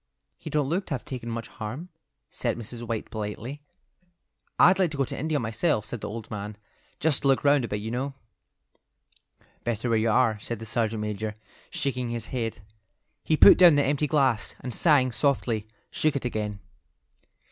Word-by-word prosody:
"He - - -7
don't 150 -3 +1
look 180 +6 -1
to 145 - -1
have 125 - -8
taken 125 -3 -6
much 115 0 -4
harm," 125 +11 -7 0.4
said 120 -2 -2
Mrs. 120 +1 -7
White, 115 -2 -4
politely. 110 +6 -5 1.0
"I'd 185 +2 +6
like 185 -3 +3
to 150 - -6
go 135 - +2
to - - -4
India 155 +1 -1
myself," 110 +1 0
said 115 0 -6
the - - -4
old 110 0 -7
man, 105 0 -5 0.4
"just 155 -2 +2
to 140 - +1
look 135 -1 +3
round 140 -3 +4
a - - -5
bit, 105 -1 -3
you 110 +2 -4
know." 135 +3 -3 1.5
"Better 120 0 -1
where 115 -1 +3
you 115 +1 +2
are," 110 -2 +3
said 120 +2 -4
the 115 - -8
sergeant 110 -1 -1
major, 105 0 -3 0.3
shaking 125 -3 -2
his 115 -1 -4
head. 115 -5 -3 0.6
He 155 - +2
put - - +9
down 175 -4 +8
the 145 - +4
empty 145 +2 +1
glass, 135 -7 +1
and 125 -1 -5
sighing 140 -5 +4
softly, 115 -3 0 0.2
shook 155 -2 +1
it 135 - -2
again. 105 -4 -2
120 Hz, 185 wpm, -27 LUFS, 110-140 Hz, 1.5 s, put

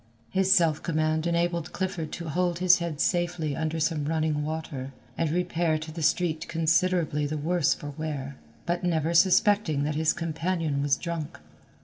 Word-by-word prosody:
His 190 0 +2
self 165 -5 +4
command 155 0 0
enabled 170 -1 -1
Clifford 180 -5 -3
to 170 -1 -5
hold 175 +2 0
his 185 +1 +5
head 170 -4 -4
safely 175 -4 0
under 160 +1 -2
some 155 -2 0
running 155 -1 0
water, 150 -4 -5 0.2
and 165 -2 0
repair 170 -1 0
to 155 0 -7
the 165 +1 -6
street 160 0 +1
considerably 165 -2 +1
the 155 +1 -3
worse 165 +1 +1
for 145 - -7
wear, 140 -3 -5 0.3
but 175 +1 -1
never 165 -2 0
suspecting 190 -3 +4
that 150 +1 -1
his 155 +1 +2
companion 165 -2 -2
was 140 -1 +2
drunk. 170 -3 -5
160 Hz, 160 wpm, -27 LUFS, 155-175 Hz, 0.3 s, his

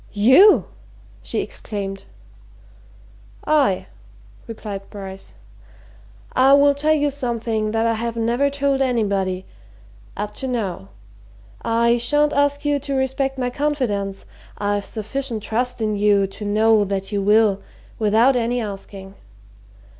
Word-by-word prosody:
"You!" 260 - +6 0.6
she - - -2
exclaimed. 195 -2 -6 1.4
"I!" 280 -11 +2 0.6
replied 210 -3 -7
Bryce. 195 -2 -9 1.0
"I 265 +2 +5
will 285 0 +6
tell 305 +2 +2
you 290 -1 +1
something 230 -5 -2
that 225 +1 0
I 230 - +2
have 230 +1 -4
never 240 +5 +1
told 280 -1 0
anybody 200 -7 0 0.7
up 210 0 -4
to 265 - -3
now. 195 - -3 0.7
I 235 +1 +2
shan't 295 +5 +2
ask 285 +1 +1
you 290 -1 +1
to 280 0 -4
respect 270 +1 -1
my 250 -1 -2
confidence 245 -9 -2 0.3
I've 205 0 -1
sufficient 225 +1 -4
trust 245 +2 -2
in 215 -1 0
you 205 -1 +3
to 195 +2 -7
know 215 +1 +3
that 195 0 -3
you 200 -1 -1
will, 210 0 +3 0.4
without 225 +5 +3
any 245 0 0
asking. 195 -2 -7
230 Hz, 125 wpm, -21 LUFS, 205-270 Hz, 1.4 s, You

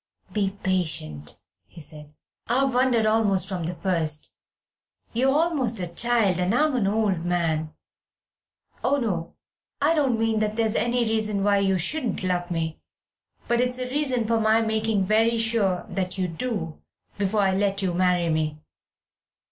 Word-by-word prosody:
"Be 200 -1 -1
patient," 155 - -1 0.3
he 170 - -14
said. 150 -1 -6 0.3
"I've 265 +3 +2
wondered 250 -3 +3
almost 215 -4 +2
from 185 -4 -3
the 175 +2 -2
first. 165 -5 0 0.8
You're 255 +4 +2
almost 285 - +1
a 180 - -1
child, 200 0 +1
and 180 +5 +1
I'm 300 0 +2
an 220 -6 +1
old 200 -5 0
man 160 -3 -1 1.1
oh, 270 +3 +3
no, 185 -10 -3 0.4
I 295 +3 +3
don't 270 -7 +1
mean 225 -1 +1
that 215 0 -1
that's 225 -2 +1
any 240 +1 +1
reason 215 -2 0
why 200 0 +3
you 195 -1 +2
shouldn't 245 - -1
love 180 -1 -1
me, 165 -2 -3 0.7
but 240 0 +2
it's 250 0 0
a 255 0 -4
reason 260 -5 0
for 230 +1 +1
my 220 0 +3
making 220 -2 0
very 225 +3 +3
sure 225 -5 +1
that 185 -1 -3
you 185 -1 0
do 175 -2 -4 0.4
before 205 +1 +1
I 190 -1 +2
let 195 0 0
you 180 -2 0
marry 180 -1 +2
me. 155 -1 -1
205 Hz, 155 wpm, -25 LUFS, 180-230 Hz, 1.1 s, wondered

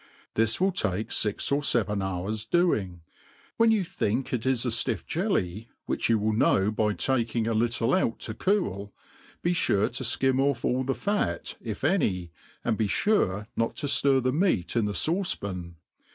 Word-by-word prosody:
This 115 0 +2
will 190 +2 +3
take 110 - -1
iix 105 +4 -1
or 140 +1 +2
feven 105 -7 +1
hours 95 +3 -3
doing. 110 - 0 0.6
When 230 0 +5
yqu 215 -4 +2
think, 130 -4 -2
it 125 0 -1
is 130 -2 +1
a - - +1
ftiff 115 -2 0
jelly, 115 - -2 0.2
which - - -1
you 115 - +4
will 110 +1 0
know 105 -2 +3
by 105 -1 0
taking 115 -2 0
a 115 - 0
little 115 +2 +1
out 150 -11 +1
to 110 - -4
cool, 105 - -1 0.5
be 175 - +2
fure 105 - +2
to. 120 - -4
ikim 130 +1 +2
off 140 -3 0
all 130 +1 +1
the 135 +1 -1
fat, 205 0 -2
if 110 -1 -6
any, 105 - +1 0.3
and 110 -2 0
be 110 - +2
fure 105 - +1
not 115 0 -1
to 155 - -4
ftir 140 -2 +3
the 130 0 +1
meat 150 - +1
in 115 -3 +2
the 105 - -2
fauce 175 - 0
pan. 90 -4 -6
115 Hz, 180 wpm, -27 LUFS, 105-140 Hz, 0.6 s, When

